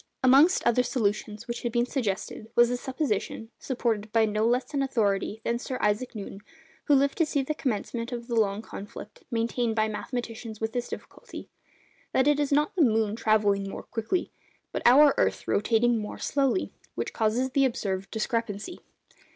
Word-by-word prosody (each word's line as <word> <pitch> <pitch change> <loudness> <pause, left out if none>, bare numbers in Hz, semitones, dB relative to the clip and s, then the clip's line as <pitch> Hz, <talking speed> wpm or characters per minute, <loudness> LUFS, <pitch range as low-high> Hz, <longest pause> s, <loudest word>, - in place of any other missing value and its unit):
Amongst 275 +8 +5
other 240 +1 +4
solutions 215 -2 -2
which 235 0 -4
had 240 - -2
been 240 +1 +2
suggested, 220 -3 -3
was 240 0 +6
the 245 - -1
supposition 245 -4 -3
(supported 225 -5 -2
by 225 0 +4
no 215 +1 +1
less 250 +3 0
an 280 - +1
authority 220 -5 0
than 235 0 0
Sir 255 +1 -4
Isaac 210 +4 0
Newton, 200 -1 -7 0.5
who 290 - +5
lived 275 +3 +2
to 330 - +5
see 285 -2 0
the 305 - -2
commencement 235 -3 -3
of 240 -1 -5
the 240 - -4
long 215 -2 +1
conflict 205 -1 -10
maintained 230 0 0
by 215 -1 +2
mathematicians 230 0 -5
with 220 0 -2
this 245 -1 -2
difficulty), - - -9 0.6
that 260 +1 +3
it 295 0 +4
is 290 -1 0
not 295 +4 +2
the 360 - +2
moon 220 -5 +3
travelling 205 -3 +2
more - - -7
quickly, 235 - -2 0.4
but - - -3
our 280 +4 +7
earth 95 +2 0
rotating 225 - +2
more 210 - -6
slowly, 280 +5 0 0.2
which - - -3
causes 235 +4 0
the 275 +1 +3
observed 195 -6 -2
discrepancy. 225 - -3
235 Hz, 175 wpm, -27 LUFS, 215-260 Hz, 0.6 s, our